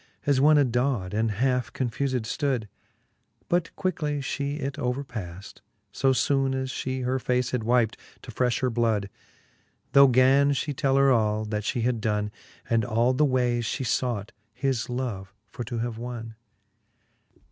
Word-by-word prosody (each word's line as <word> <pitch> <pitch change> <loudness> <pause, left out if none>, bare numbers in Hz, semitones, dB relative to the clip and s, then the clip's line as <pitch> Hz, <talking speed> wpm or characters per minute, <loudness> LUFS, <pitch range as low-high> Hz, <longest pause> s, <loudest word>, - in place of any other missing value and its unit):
As 140 -2 +3
one 150 +1 +6
adaw'd, 125 -7 +1
and 110 +1 +1
half 125 +3 0
confufed 130 +1 -1
ftood; 125 -1 -1 0.8
But 175 -1 +1
quickly 155 -6 -1
Ihe 140 +1 -3
it 140 -1 -4
overpaft, 105 -8 -5 0.3
fo 135 +6 +2
foone 135 0 +1
As 130 0 -2
fhe 130 -1 -3
her 130 +1 0
face 125 0 0
had 125 - -1
wypt, 115 0 +2 0.3
to 125 - -8
frefh 125 +1 0
her 130 -1 +1
blood: 110 -4 0 0.8
Tho 140 0 +8
gan 135 +3 +4
fhe 145 +1 -2
tell 135 0 +1
her 135 0 +5
all, 110 -2 +2
that 105 0 -2
fhe 115 +2 -2
had 120 -2 0
donne, 105 -1 -1 0.4
And 115 -1 +2
all 120 +1 +2
the 150 +4 +3
wayes 125 -3 +1
fhe 135 - -2
fought, 115 -4 -1 0.2
his 135 -4 -1
love 115 -6 -4
for 105 +4 -7
to 120 +1 -4
have 115 -1 -3
wonne: 115 -2 -6
XLVI. 110 -1 -39
125 Hz, 160 wpm, -26 LUFS, 110-135 Hz, 0.8 s, Tho